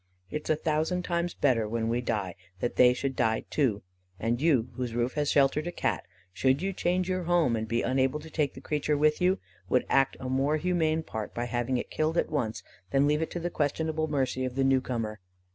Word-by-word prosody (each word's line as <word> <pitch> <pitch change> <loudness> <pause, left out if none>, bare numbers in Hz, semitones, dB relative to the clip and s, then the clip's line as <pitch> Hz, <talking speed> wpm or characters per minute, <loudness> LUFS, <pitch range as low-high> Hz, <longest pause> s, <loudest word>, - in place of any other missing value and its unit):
It 150 - -4
is - - -7
a 155 - +4
thousand 160 +4 0
times 170 -1 -1
better 120 -6 +2
when 115 +1 -1
we 120 +2 0
die 105 -7 -2 0.3
that 120 - -2
they 125 -1 +7
should 135 +2 -2
die 110 -1 +1
too; 120 -9 +1 0.4
and 115 +5 0
you, 135 -7 +3
whose 120 -1 -4
roof 120 +1 0
has 150 -1 0
sheltered 145 +3 +3
a - - -2
Cat, - - -2 0.3
should 130 +6 +2
you 195 +3 -2
change 180 0 0
your 185 -1 -1
home, 170 -8 +3
and 110 0 -3
be 115 +1 0
unable 130 +3 +1
to 160 +1 -11
take 150 -4 0
the 130 - -9
creature 150 +1 0
with 150 +2 +2
you, 185 +2 +3 0.3
would 125 - +2
act 135 -1 +3
a 130 - -5
more 135 +4 +1
humane 160 -2 +1
part 110 -8 -6
by 120 - -1
having 120 +1 -1
it - - -5
killed 155 +2 0
at - - +1
once 120 -8 -2 0.3
than 135 +4 +3
leave 150 +1 +2
it 160 - -1
to 175 - -4
the 175 +1 -3
questionable 155 +1 -1
mercy 135 -3 -1
of 130 -1 -3
the 135 - +2
new 135 -1 +4
comer. 115 -4 -3
135 Hz, 230 wpm, -28 LUFS, 120-155 Hz, 0.4 s, they